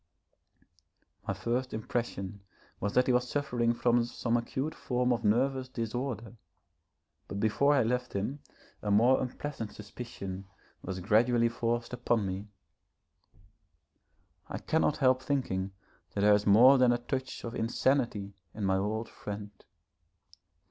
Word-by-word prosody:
My - - -1
first 125 +1 -2
impression 105 -3 -3 0.4
was 100 +1 -2
that 125 - +5
he 130 - +2
was 125 0 +1
suffering 125 -5 +1
from 120 0 +3
some 120 0 -1
acute 130 +5 -2
form 125 0 0
of 120 0 -3
nervous 130 +4 +1
disorder, 120 -1 -4 0.9
but 100 - -5
before 140 +7 +3
I 135 - +4
left 125 +2 -1
him 105 +9 -2 0.4
a 105 - -3
more 115 +6 +5
unpleasant 125 -3 -5
suspicion 100 -3 -7 0.3
was 95 0 -5
gradually 115 +4 +3
forced 115 +1 -2
upon 120 -3 +1
me. 95 +2 -4 2.0
I - - -4
cannot 160 -2 +1
help 130 -1 +3
thinking 110 -9 -1 0.4
that 100 - 0
there 105 +1 +6
is 105 0 +2
more 125 +7 +8
than 125 -1 +5
a 120 - +2
touch 130 +2 -4
of 115 - -5
insanity 115 -3 0 0.2
in 105 - -2
my 95 0 +2
old 110 +3 -1
friend. 105 0 -7
120 Hz, 135 wpm, -30 LUFS, 105-125 Hz, 2.0 s, more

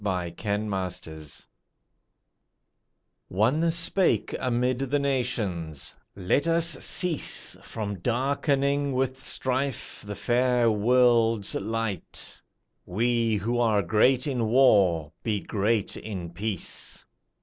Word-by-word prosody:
Disarmament 90 - -4 1.8
One 130 - +2
spake 170 - +1
amid 125 0 0
the 135 +1 0
nations, 110 - -2 0.2
"Let 100 - +1
us 165 0 +2
cease 160 +3 0
From 105 -3 -5
darkening 140 - 0
with 130 0 -1
strife 130 -2 -2
the 105 - -5
fair 120 +2 +2
World's 115 -1 +3
light, 110 -3 -4 0.4
We 115 +3 +1
who 115 +5 -1
are 110 -4 +3
great 120 +9 +3
in 125 -6 -1
war 100 - +4
be 105 -3 -1
great 105 +1 -1
in 95 -6 -6
peace. 100 +2 -5
115 Hz, 95 wpm, -26 LUFS, 100-130 Hz, 1.8 s, war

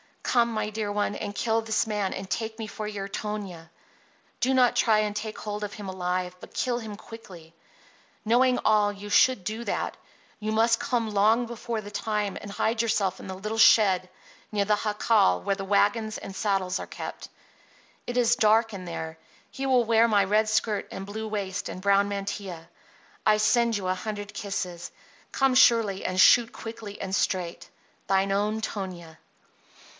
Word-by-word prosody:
Come, 235 -1 +2
my 215 -1 -2
dear 215 -1 -3
one, 205 0 -1
and 205 -1 -5
kill 225 +1 +1
this 220 0 0
man 210 -3 -2
and 190 0 -6
take 220 +3 -3
me 225 - -5
for 215 0 -6
your 200 -2 -5
Tonia. 195 -6 -5 0.7
Do 260 +2 +2
not 250 -2 +4
try 215 -2 +4
to 210 -1 -2
take 215 +1 -5
hold 210 0 -5
of 205 -1 -4
him 200 -2 -7
alive, 180 -1 -2
but - - -13
kill 245 -1 -1
him 220 -3 -7
quickly. 185 -7 -12 0.7
Knowing 250 +3 +3
all, 210 -1 +3
you 205 +1 -9
should 255 -1 +4
do 220 +4 -4
that. - - -2 0.4
You 215 0 -2
must 230 +1 +3
come 230 -3 -1
long 215 +4 +3
before 235 -1 -4
the 205 0 -10
time 210 -1 -2
and 205 - -8
hide 220 +3 0
yourself 210 -5 0
in - - -9
the 190 - -5
little 215 +4 -4
shed 190 -5 +5 0.4
near 205 -1 +2
the 210 +1 +1
jacal 210 - +2
where 200 - 0
the 195 0 -6
wagon 205 +2 +2
and 195 - -7
saddles 190 -2 0
are - - -6
kept. - - -7 0.8
It 245 - -4
is 240 0 +3
dark 225 0 +3
in 185 -2 -7
there. 160 -2 -6 0.3
He 270 - -5
will 255 -2 +4
wear 230 0 +4
my 205 -3 +3
red 210 +3 +2
skirt 215 -1 0
and 190 - -6
blue 220 +2 -5
waist 200 -2 -3
and 185 - -7
brown 200 +1 +3
mantilla. 195 -4 -5 0.6
I 215 - +6
send 235 +2 +3
you 190 -2 -4
a 185 - +2
hundred 205 +1 -6
kisses. 180 -4 -4 0.4
Come 270 -1 +2
surely 225 -6 +4
and 185 0 -1
shoot 235 +5 +6
quickly 225 -3 -8
and 190 - -4
straight. 180 -3 -1 0.4
THINE 195 0 +2
OWN 210 +2 0
TONIA. 175 -7 -6
210 Hz, 180 wpm, -26 LUFS, 195-225 Hz, 0.8 s, I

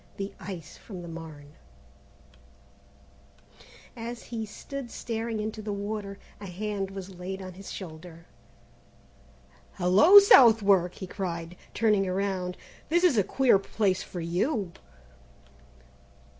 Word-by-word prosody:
The 200 0 -4
ice 175 -3 -8
from 185 -5 -9
the - - -8
Marne. 160 -3 -10 2.4
As 235 0 -6
he 225 -2 -5
stood 270 +4 -7
staring 225 -1 -4
into 215 0 -4
the 215 0 -4
water, 200 0 -4 0.2
a 205 - -8
hand 195 +1 -3
was 195 -2 -9
laid 190 +2 -5
on 185 -1 -8
his 195 +2 -10
shoulder. 165 -2 -9 1.5
"Hello, 195 - +6
Southwark!" 215 - +7
he 190 - -7
cried, 175 -3 -5 0.2
turning 210 -4 +2
around; 185 -1 -2 0.3
"this 345 +3 +2
is 350 -8 +5
a - - +4
queer 255 -1 +3
place 195 -1 0
for 175 - -7
you!" 185 - -1
195 Hz, 115 wpm, -28 LUFS, 180-220 Hz, 2.4 s, Southwark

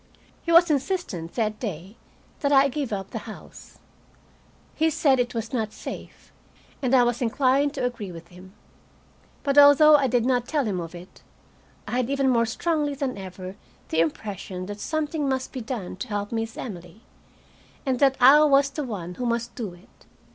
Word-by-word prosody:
He 335 - -3
was 335 0 +6
insistent, 275 - -2
that 215 -2 -1
day, 195 -2 -6 0.4
that 280 - 0
I 275 0 +5
give 280 -2 -3
up 195 -2 -4
the - - -4
house. - - -12 1.0
He 320 +1 +2
said 275 -4 +2
it 245 0 -1
was 225 0 -4
not 220 -4 -1
safe, - - -9 0.5
and 260 -1 +2
I 250 - +6
was 240 +1 0
inclined 270 +4 +2
to 260 -3 -1
agree 225 -6 -4
with 170 0 -11
him. 185 +1 -14 0.9
But 280 0 +4
although 290 +2 +8
I 275 -2 +1
did 245 -1 +1
not 250 -2 +1
tell 295 -4 0
him 195 -4 -2
of 170 0 -7
it, 175 +2 -13 0.7
I - - -6
had 250 -1 0
even 275 -1 +1
more 230 -2 +2
strongly 295 +3 -1
than 270 -2 -3
ever 185 0 -8 0.3
the 160 - 0
impression 180 +3 -3
that 205 +2 -7
something 310 +1 -2
must 260 -1 -2
be 260 - -5
done 220 -6 -5
to - - -5
help 205 -1 -3
Miss 225 0 -3
Emily, 180 -2 -8 0.8
and 260 -2 0
that 270 -2 +4
I 270 +4 +8
was 280 -2 +4
the 295 +2 -4
one 190 -8 -5
who 245 +5 -3
must 235 0 -2
do 210 -8 -6
it. 175 - -23
245 Hz, 185 wpm, -25 LUFS, 200-280 Hz, 1.0 s, although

